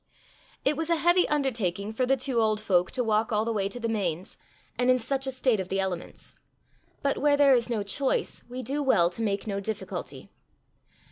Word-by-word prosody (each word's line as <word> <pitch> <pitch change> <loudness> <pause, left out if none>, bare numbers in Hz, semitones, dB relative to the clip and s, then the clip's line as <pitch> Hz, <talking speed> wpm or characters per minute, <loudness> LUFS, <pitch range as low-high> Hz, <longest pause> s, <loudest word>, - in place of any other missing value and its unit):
It 285 +2 +3
was 325 +1 -3
a 335 - +4
heavy 345 +3 +3
undertaking 220 -9 -1
for 250 +3 0
the 270 +1 +3
two 255 -2 0
old 215 -1 +2
folk 180 -4 +2
to 255 - 0
walk 220 0 +1
all 215 0 +1
the 230 - -1
way 200 -2 0
to 245 - -7
the 230 - -2
Mains, 185 -6 -2 0.4
and 250 0 +1
in 255 - +5
such 270 +3 -2
a - - -1
state 255 -4 +1
of 185 -1 -4
the 195 - -1
elements; 190 -3 -4 0.7
but 280 -1 +1
where 290 0 +3
there 280 -1 +6
is 240 -1 +2
no 220 -4 -1
choice, 265 +7 0
we 255 +1 -6
do 285 +3 -2
well 175 -11 +3
to 225 - -5
make 200 -2 -1
no 200 -2 -2
difficulty. 215 +1 -5
230 Hz, 210 wpm, -27 LUFS, 200-270 Hz, 0.7 s, there